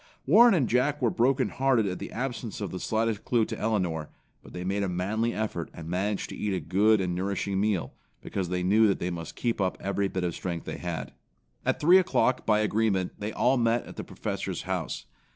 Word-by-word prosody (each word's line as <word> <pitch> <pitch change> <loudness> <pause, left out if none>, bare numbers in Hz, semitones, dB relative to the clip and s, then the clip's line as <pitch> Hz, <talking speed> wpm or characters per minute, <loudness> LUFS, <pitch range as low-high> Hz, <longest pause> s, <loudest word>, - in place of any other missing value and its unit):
Warren 220 - +7
and 140 -8 +2
Jack 135 +5 +1
were 120 -5 +2
broken 125 +3 +2
hearted 130 -4 +2
at 90 -2 -3
the - - -6
absence 120 -3 -4
of 100 -4 -4
the 90 - -5
slightest 110 0 -1
clue 115 -3 +2
to - - -5
Elinor, 90 -8 -1 0.3
but - - -14
they 90 - -6
made 100 +2 -1
a 100 - 0
manly 105 +6 0
effort 105 -7 -3
and 80 -1 -8
managed 95 +4 -1
to - - -6
eat 100 -2 -1
a - - -1
good 105 +5 +3
and 90 -2 -1
nourishing 95 +1 -1
meal, 105 -4 0 0.3
because 95 -3 -4
they 90 0 -1
knew 105 +4 +5
that 100 - +2
they 90 - -3
must 85 -1 -6
keep 115 -4 -1
up 95 -1 0
every 100 0 -1
bit 95 -1 -3
of 85 -2 -1
strength 85 -1 -4
they - - -5
had. 85 -2 -4 0.5
At - - +1
three 175 +5 +7
o'clock 130 -8 +1
by 105 -1 +4
agreement 105 -3 +1
they 105 +1 -3
all 125 +4 +2
met 115 0 +1
at - - -10
the - - -5
Professor's - - -4
house. - - -3
105 Hz, 220 wpm, -28 LUFS, 90-115 Hz, 0.5 s, Warren